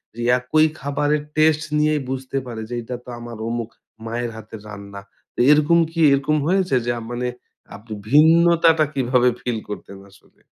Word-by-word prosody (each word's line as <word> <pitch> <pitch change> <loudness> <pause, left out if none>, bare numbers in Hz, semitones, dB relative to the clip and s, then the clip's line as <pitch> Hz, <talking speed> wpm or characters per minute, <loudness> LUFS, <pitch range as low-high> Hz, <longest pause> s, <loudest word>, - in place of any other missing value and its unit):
যে 120 - -6 0.2
একই 155 +5 +3
খাবারের 145 +1 0
টেস্ট 155 0 +3 0.2
নিয়েই 150 -1 +2
বুঝতে 130 +1 -4
পারে 115 -2 -6
যে, 120 - -4
"এটা 125 +2 -6
তো - - -11
আমার 120 -1 -8
অমুক 115 -1 -3 0.4
মায়ের 120 +1 -3
হাতের 110 -1 -10
রান্না।" 100 -1 -9 0.3
তো - - -8
এরকম 150 +3 +4
কি 165 - -6
এরকম 140 +2 +2
হয়েছে? 185 -6 +1
যে 120 - 0
আ - - -9
মানে 125 +1 -2 0.5
আপনি 110 +2 -10 0.2
ভিন্নতাটা 165 +1 +5
কীভাবে 125 -1 +2
ফিল 120 -2 -2
করতেন 100 -1 -8
আসলে? 100 - -24
130 Hz, 165 wpm, -21 LUFS, 115-155 Hz, 0.5 s, ভিন্নতাটা